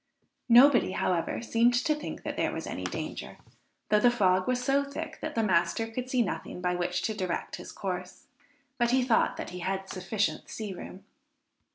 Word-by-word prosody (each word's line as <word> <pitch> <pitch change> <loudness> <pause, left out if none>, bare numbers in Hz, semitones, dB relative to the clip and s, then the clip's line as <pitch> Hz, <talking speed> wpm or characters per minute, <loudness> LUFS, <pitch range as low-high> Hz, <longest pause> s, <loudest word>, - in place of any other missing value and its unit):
Nobody, 245 -4 +7
however, 180 +4 -1
seemed 235 +1 +3
to 285 +5 +2
think 300 0 -6
that - - -4
there - - 0
was - - -5
any - - -5
danger, - - -5 0.5
though 210 - +5
the 245 - +6
fog 185 -6 +2
was 255 -1 +1
so 275 +2 +2
thick 280 +3 -6
that 315 - -4
the 225 - +2
master 175 +2 +2
could 245 +3 -5
see 255 -2 +3
nothing 180 - -5
by 180 0 0
which 180 +1 -1
to 220 - 0
direct 185 -4 -3
his - - -9
course; 185 -2 -5 0.5
but 240 0 +3
he 255 +1 +3
thought 245 -2 +2
that - - -5
he 180 - -6
had 190 +2 -2
sufficient 195 +3 -2
sea 210 -3 -5
room. 185 +1 -9
215 Hz, 190 wpm, -29 LUFS, 185-245 Hz, 0.5 s, Nobody